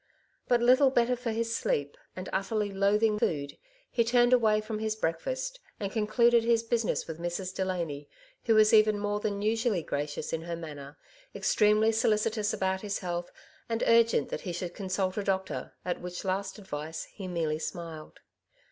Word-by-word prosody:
But 240 -1 +3
little 260 +3 +6
better 245 -1 +2
for 245 -1 -4
his 230 +1 -1
sleep, 145 0 -1 0.2
and 185 0 -6
utterly 205 +1 -1
loathing 210 +2 +2
food, 140 -6 -1 0.4
he 235 - +2
turned 240 +1 +4
away 220 -4 +4
from 215 0 -4
his 220 0 -1
breakfast, - - -3 0.2
and 200 -2 -3
con 215 -1 -1
cluded 235 +1 +4
his 230 -1 +2
business 230 -1 0
with 160 -1 -7
Mrs. 175 +2 -3
Delany, 170 -7 -3 0.4
who 225 - +4
was 215 0 +5
even 215 -1 +6
more 205 0 -1
than 205 -1 -2
usually 220 -4 +1
gracious 145 0 -3
in 165 - -1
her 170 +1 -4
manner, 145 -4 -9 0.4
ex - - 0
tremely 215 +1 +4
soUcitous 215 -1 +1
about 190 -2 -1
his 205 -1 -2
health, 175 -1 -4 0.4
and 230 0 -1
urgent 230 0 +4
that - - -4
he 180 - -4
should 175 0 -4
consult 190 0 -2
a 205 - 0
doctor, 190 -1 -2
at 180 - -2
which 180 +1 -6
last 190 +2 -2
advice 160 -5 -6
he 195 -3 -9
merely 160 -3 -1
smiled. 160 0 -7
205 Hz, 175 wpm, -29 LUFS, 175-225 Hz, 0.4 s, little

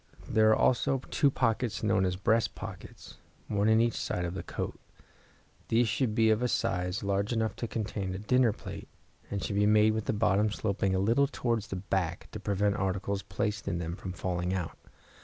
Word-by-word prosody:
There 110 0 +4
are 110 - +6
also 130 +2 +2
two 145 - +4
pockets 120 -3 0
known 95 -2 +3
as 90 0 0
breast 110 +4 +1
pockets, - - -9 0.3
one 105 +1 +1
in 110 0 +5
each 115 0 +3
side 90 - -2
of 85 - -3
the 95 - -4
coat. - - -5 0.9
These 115 +1 +3
should 110 +1 0
be 110 -1 +4
of 110 +2 +2
a 125 - +2
size 90 -2 -1
large 100 +2 0
enough 110 -2 0
to 120 - -3
contain 100 -4 -3
a - - -3
dinner 120 +3 +3
plate, - - -8 0.4
and 100 -1 -3
should 100 - -2
be 105 0 +4
made 110 +1 +5
with 110 -1 -2
the - - 0
bottom 105 0 +2
sloping 100 -2 -1
a - - +2
little 115 +9 +3
towards 120 -6 -1
the - - -5
back, 90 -2 -2
to - - -6
prevent 100 0 0
articles 95 +1 -1
placed 100 +2 -3
in 85 - 0
them 85 0 -3
from 95 - -6
falling 90 0 -2
out. 85 -3 -3
105 Hz, 200 wpm, -30 LUFS, 95-110 Hz, 0.9 s, are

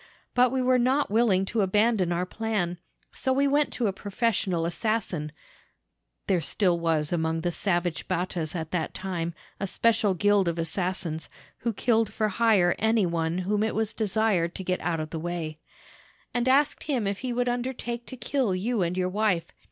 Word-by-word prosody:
But 250 -1 +4
we 260 -1 0
were 255 0 +4
not 260 +1 +2
willing 210 -4 +3
to 220 +3 0
abandon 205 -1 +2
our 175 +1 0
plan, 190 -4 -2 0.3
so 265 - -1
we 275 +2 +3
went 290 +1 +2
to 245 - -1
a 200 - +1
professional 195 -4 -1
assassin 175 -4 -1 0.9
[there 185 -3 +2
still 175 +2 +1
was 160 -2 0
among 160 -1 0
the 175 +1 0
savage 175 -2 -1
Battas 175 -2 -2
at 160 -2 -4
that 170 -3 -2
time 170 -3 -3 0.2
a 195 - -1
special 215 -1 +2
gild 205 0 +3
of 170 0 -1
assassins, 165 -1 -2 0.3
who 235 - -1
killed 225 0 +1
for 215 -1 0
hire 205 -5 +3
any 220 -2 +3
one 170 0 -1
whom 200 +3 0
it 220 - 0
was 220 0 0
desired 210 -5 +1
to 190 - -5
get 185 0 -1
out 165 -1 -1
of 155 0 -4
the 160 - -3
way], 165 -2 -4 0.7
and 245 0 0
asked 285 +3 +3
him 260 -8 0
if 200 0 -2
he 255 -1 -3
would 245 +1 0
undertake 240 -1 -3
to 260 - -8
kill 250 -6 0
you 215 +4 -1
and 175 +1 -1
your 180 -1 +1
wife. 200 -3 0
195 Hz, 185 wpm, -27 LUFS, 175-230 Hz, 0.9 s, But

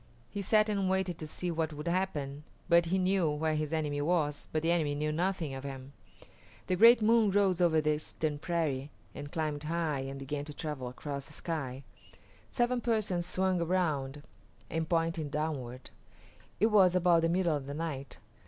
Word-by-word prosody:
He 200 - -3
sat 215 +2 +3
and 200 -3 0
waited 190 -2 0
to 155 - -5
see 175 +3 -3
what 160 -1 -1
would 150 +3 -6
happen, 150 -6 -2 0.2
for 170 0 +6
he 175 +3 0
knew 185 -3 +2
where 155 +1 0
his 155 0 -2
enemy 150 -3 -1
was, 150 -2 0
but 155 0 -1
the 165 - +2
enemy 155 -4 +1
knew 150 +1 -1
nothing 170 -2 -1
of 135 0 -6
him. 135 0 -7 0.7
The 185 - 0
great 230 +3 +7
moon 225 -1 +5
rose 195 -3 +2
over 160 -3 +4
the 150 0 +2
eastern 150 0 -3
prairie 150 -5 -1 0.2
and 145 0 -8
climbed 155 -3 -2
high 160 -3 -1
and 135 +1 -5
began 140 +1 -4
to 150 -1 -9
travel 150 -6 -4
across 140 +2 -6
the 155 - -13
sky. 140 -5 -4 0.7
Seven 240 0 0
Persons 205 -7 0
swung 185 -1 +1
around 150 -6 -1 0.5
and 160 -1 -2
pointed 165 -2 0
downward. 140 -5 -4 0.7
It 220 +4 +3
was 190 -4 +5
about 175 -2 +4
the 165 - +2
middle 175 -2 +2
of 140 -2 -5
the 140 - -5
night. 145 -4 -5
160 Hz, 180 wpm, -31 LUFS, 145-180 Hz, 0.7 s, great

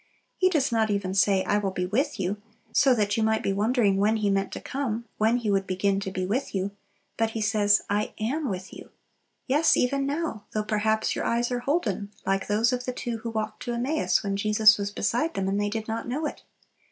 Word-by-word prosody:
He 370 - +3
does 300 -8 +1
not 220 -1 +2
even 200 -2 -1
say, 195 -1 +3
"I 205 - +1
will 200 -2 -1
be 180 -1 -2
with 245 +6 -1
you;" 195 +2 -1 0.3
so 270 -3 +4
that 205 -2 0
you - - +1
might 220 0 +1
be 195 - 0
wondering 210 -1 +2
when 210 +3 +2
He 205 -2 +1
meant 195 0 0
to - - -5
come, 235 -4 -3
when 220 +3 +3
He 225 -4 -1
would 195 -1 +1
begin 195 +1 +1
to 195 -1 -4
be 185 -1 -3
"with 220 +4 -2
you;" 195 +1 -1 0.5
but 225 0 +1
He - - -2
says, 210 -1 +3
"I 205 +1 -1
am 270 +6 -1
with 185 -1 -5
you." - - -11 0.6
Yes, 295 +5 +3
even 275 +2 +1
now, 285 -7 -3
though 215 - 0
perhaps 220 +1 0
your - - -2
eyes 235 +1 0
are 245 - 0
holden, 240 - -1 0.2
like 195 0 0
those 220 +4 +2
of 250 0 -2
the 255 - -3
two 240 -2 -4
who 230 - -5
walked 220 -1 -4
to 240 - -3
Emmaus 270 +5 +1
when 200 -1 -1
Jesus 215 +1 +5
was 200 0 -2
beside 240 +10 -1
them 190 -1 -1
and 200 +1 0
they 205 - 0
did 220 +1 -4
not 225 +1 -3
know 285 +6 -2
it. - - -5
215 Hz, 230 wpm, -26 LUFS, 200-245 Hz, 0.6 s, Jesus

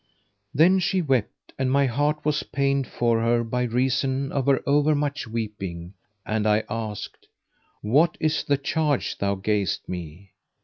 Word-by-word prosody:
Then, 175 +6 +5
she 185 +1 +1
wept, 135 - -1
and 130 -1 +1
my 140 +1 +4
heart 145 +4 0
was 150 -1 +1
pained 140 -1 0
for 115 -1 +1
her 120 +1 +2
by 125 +2 -2
reason 130 +3 0
of 140 -2 -1
her 135 -1 +3
over 145 +2 +3
much 145 -2 -2
weeping, 100 -6 -5 0.3
and 110 0 0
I 105 +1 +3
asked, 110 -2 -5 0.6
"What 145 +11 +3
is 155 -1 +1
the 140 - +1
charge 145 0 -1
thou 100 0 0
gayest 100 -2 -1
me?" 90 +2 -7
130 Hz, 150 wpm, -24 LUFS, 110-145 Hz, 0.6 s, Then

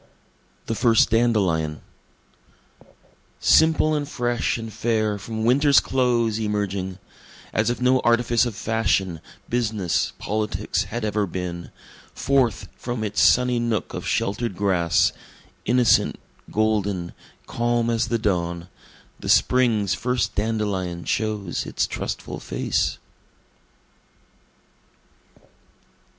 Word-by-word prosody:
The - - -2
First 115 -1 +3
Dandelion 95 -10 +1 1.6
Simple 160 -1 +4
and 145 -1 -2
fresh 120 -2 -1
and 115 -2 -7
fair 110 -3 0
from 110 +2 -5
winter's 140 +4 +5
close 120 -4 +1
emerging, 100 -3 -2 0.6
As - - +1
if 120 - -2
no 130 +1 +3
artifice 120 0 +2
of 115 - -6
fashion, 110 -6 0 0.3
business, 110 -7 -1
politics, 105 -2 -2
had 110 +3 -4
ever 105 -1 0
been, 85 -1 -5 0.5
Forth 130 -6 +1
from 120 -2 -4
its 105 -1 0
sunny 125 -1 +4
nook 115 -2 -2
of - - -5
shelter'd 105 +1 -1
grass 90 -5 +2 0.5
innocent, 125 +1 +3 0.3
golden, 105 -5 0 0.3
calm 120 0 0
as 115 +1 0
the 115 - 0
dawn, 85 -5 -2 0.5
The - - -6
spring's 115 -6 +3
first 125 +3 -1
dandelion 100 -5 -2
shows 105 -4 -2
its - - 0
trustful - - -5
face. - - -1
110 Hz, 105 wpm, -23 LUFS, 100-120 Hz, 1.6 s, winter's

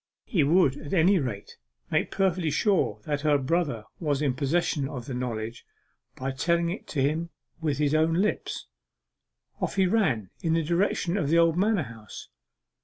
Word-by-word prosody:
He 175 -9 +2
would 145 -2 +3
at 145 +2 -7
any 180 +3 +5
rate 120 -8 -5 0.3
make - - +1
perfectly 185 -4 +1
sure 150 - +1
that 145 -1 -1
her 150 -1 +3
brother 140 -4 -1 0.2
was 145 -5 0
in 145 -3 +1
possession 140 +1 0
of 125 -5 -6
the 135 - -5
knowledge, 120 -2 -4 0.5
by 135 +1 -3
telling 170 +5 +1
it 195 - -7
him 155 +4 0 0.3
with 150 -3 0
his 150 0 +1
own 160 +1 +3
lips. 205 +4 -1 1.0
Off - - -1
he 190 -1 +3
ran 155 - +1
in 165 -1 +1
the 165 0 +2
direction 175 +2 0
of 150 -8 0
the 165 - +4
old 165 -1 +4
manor 200 -1 +2
house. 115 -4 -10
155 Hz, 170 wpm, -27 LUFS, 135-175 Hz, 1.0 s, any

